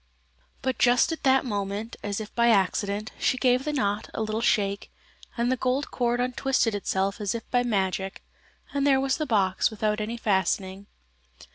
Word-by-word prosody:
But 260 0 -1
just 245 +5 +4
at 325 - -4
that 265 0 +3
moment, 205 0 -3
as 205 0 -3
if 215 -1 -8
by 235 0 +3
accident, 205 0 +1
she 255 - +1
gave 255 0 +2
the 300 - 0
knot 205 -7 -1
a 220 - -1
little 215 +1 -2
shake, 200 -4 0 0.5
and 235 +2 +1
the - - +3
gold 260 +3 -1
cord 240 -1 0
untwisted 250 -2 +1
itself 195 +1 -1
as 205 +1 -1
if 230 - -6
by 245 - +3
magic, 195 -4 -1 0.5
and 280 0 +1
there 270 -1 +4
was 270 0 0
the 310 - -2
box 195 -5 +2
without 215 0 -1
any 225 +3 -3
fastening. 190 -2 -1
220 Hz, 175 wpm, -26 LUFS, 200-250 Hz, 0.5 s, just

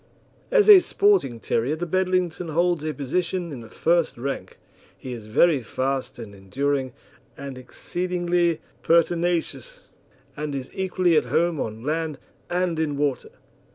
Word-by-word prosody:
As 480 -4 +4
a 415 -3 +11
sporting 390 - +2
terrier 120 +6 0
the 170 +2 -4
Bedlington 185 -1 0
holds 170 0 +1
a 155 - -1
position 170 +5 -2
in 135 - -6
the 115 -1 -11
first 170 -3 +1
rank. 135 +3 -5 0.4
He 130 - -7
is 110 -3 -9
very 145 +6 +3
fast 130 +2 -3
and 110 -4 -9
enduring, 130 +7 -2 0.4
and 140 -1 -7
exceedingly 175 +5 -1 0.2
pertinacious, 175 - 0 0.5
and 150 -1 -4
is 130 -1 -6
equally 185 -3 +1
at - - +2
home 170 -2 +1
on 110 +1 -4
land 155 0 -2 0.3
and 175 -2 0
in 150 -3 -1
water. 140 -2 -1
160 Hz, 140 wpm, -24 LUFS, 135-175 Hz, 0.5 s, a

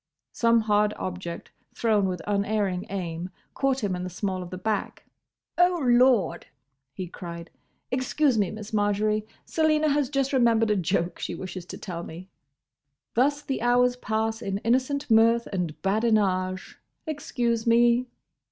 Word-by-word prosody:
Some 230 -1 +3
hard 210 -1 +2
object, 180 -2 -6 0.2
thrown 215 -4 +2
with 180 -2 -4
unerring 200 -2 0
aim, 175 -2 -4 0.2
caught 270 -2 0
him 195 -3 0
in 180 - -4
the 185 - -4
small 185 +1 -3
of 180 - -7
the 185 - -6
back. 210 +3 -3 0.5
"Oh, 355 0 +4
Lord!" 245 -5 +3 0.4
he 185 +7 -5
cried. 170 -1 -8 0.4
"Excuse 260 +2 +1
me, 205 -4 +1
Miss 215 +1 -8
Marjory; 210 +1 +1 0.2
Selina 310 -1 +2
has 285 -2 +1
just 275 -1 0
remembered 230 -4 +3
a - - +3
joke 175 -1 -1
she - - -4
wishes 185 -1 -7
to - - -7
tell 175 -4 -6
me. 175 +3 -9 0.8
Thus 285 +5 +2
the 270 -4 -3
hours 245 +1 +3
pass 220 -1 -2
in 195 -3 -2
innocent 260 +3 0
mirth 230 +1 +5
and 175 -5 -2
badinage. 195 -3 0 0.3
Excuse 240 -7 -2
me!" 240 +2 +4
215 Hz, 145 wpm, -26 LUFS, 185-245 Hz, 0.8 s, mirth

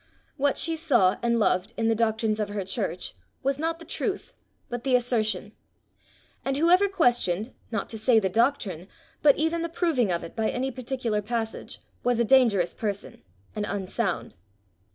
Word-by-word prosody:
What 285 -1 +1
she 330 0 +1
saw 245 - +3
and 235 0 +2
loved 205 0 +1
in 225 - +1
the 225 - +4
doctrines 220 -1 0
of 210 -1 -1
her 205 -2 -3
church 190 -2 -3 0.3
was 275 +1 0
not 325 +1 -1
the 330 - -12
truth, 405 -2 -3 0.3
but 240 -2 -5
the 265 -2 +3
assertion; 220 -5 0 0.9
and 270 0 -1
whoever 355 +6 +5
questioned, 240 - +1 0.2
not 225 -3 -2
to 220 - -5
say 230 +1 +4
the 205 -3 +3
doctrine, 195 - 0 0.3
but 285 -2 +6
even 320 +2 0
the 335 - -2
proving 320 - +1
of 170 - -1
it - - -9
by 220 -1 0
any 260 +2 -2
particular 245 -4 -2
passage, 225 +1 -4 0.2
was 245 -1 +2
a 235 - +3
dangerous 220 -8 +4
person, 205 -2 -4 0.3
and 210 - -2
unsound. 195 0 -2
235 Hz, 170 wpm, -26 LUFS, 210-270 Hz, 0.9 s, but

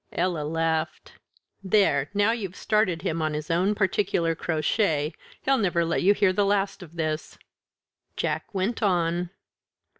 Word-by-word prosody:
Ella 175 -3 0
laughed. 160 +1 -2 0.5
"There! 185 -8 +2
now 205 +2 +3
you've 200 -6 -4
started 205 -7 +1
him 165 -4 -1
on 155 -1 -1
his 150 +1 -4
own 185 +5 +2
particular 190 -4 +1
crotchet; 155 -1 0 0.3
he'll 270 -1 +2
never 175 -5 +1
let 165 - 0
you 200 +3 +4
hear 190 -2 +3
the 205 - +2
last 200 0 0
of 170 -2 -12
this." 155 -1 -3 0.8
Jack - - -2
went 200 +4 -2
on. 175 -3 +1
175 Hz, 145 wpm, -26 LUFS, 160-200 Hz, 0.8 s, you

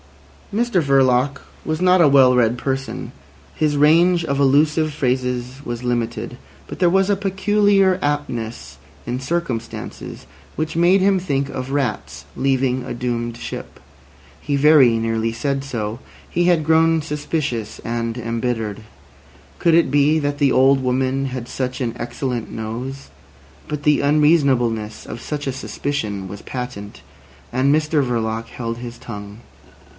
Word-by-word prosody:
Mr 225 -3 +1
Verloc 135 -1 +2 0.2
was 155 0 -2
not 185 0 +4
a 160 - +7
well 135 -2 +6
read 120 -1 +2
person; 135 +1 -4 0.4
his 150 -2 0
range 170 +4 +4
of 140 -2 -1
allusive 150 +3 +3
phrases 125 -1 -2
was 120 -1 -5
limited, 120 -1 -2 0.3
but - - -8
there 180 - +4
was 195 +2 +3
a 205 - +3
peculiar 195 0 +2
aptness 135 -6 -3 0.3
in 125 +1 -3
circumstances 135 -5 -4 0.3
which 155 +1 -2
made 175 +3 +4
him 195 0 +3
think 140 -6 -1
of 130 0 -5
rats 140 -2 -2
leaving 130 -1 0
a 125 - -5
doomed 120 -1 -3
ship. - - -8 0.6
He 145 - -1
very 140 -5 +6
nearly 115 0 -1
said 135 +4 -2
so. 115 -4 -4 0.3
He 175 +1 +1
had 170 -4 +3
grown 160 0 +4
suspicious 145 -7 -3
and 115 0 -2
embittered. 115 -2 -3 0.8
Could 170 -2 +4
it 170 -5 +3
be 145 +2 +4
that 145 -1 -2
the 140 -2 +3
old 135 +1 +4
woman 130 +1 0
had 125 -2 -5
such 125 0 -3
an 120 -3 -2
excellent 120 0 -4
nose? 125 +5 -6 0.6
But 150 -1 -4
the 150 0 +3
unreasonableness 140 -7 +2
of 115 - -8
such 145 -1 -4
a 135 - -1
suspicion 110 -7 -4
was 100 +2 -8
patent, 115 -5 -7 0.5
and 130 +3 +3
Mr 155 -1 +2
Verloc 115 -2 -2
held 115 -1 -5
his 120 -1 -8
tongue. 105 -2 -9
135 Hz, 140 wpm, -20 LUFS, 120-155 Hz, 0.8 s, a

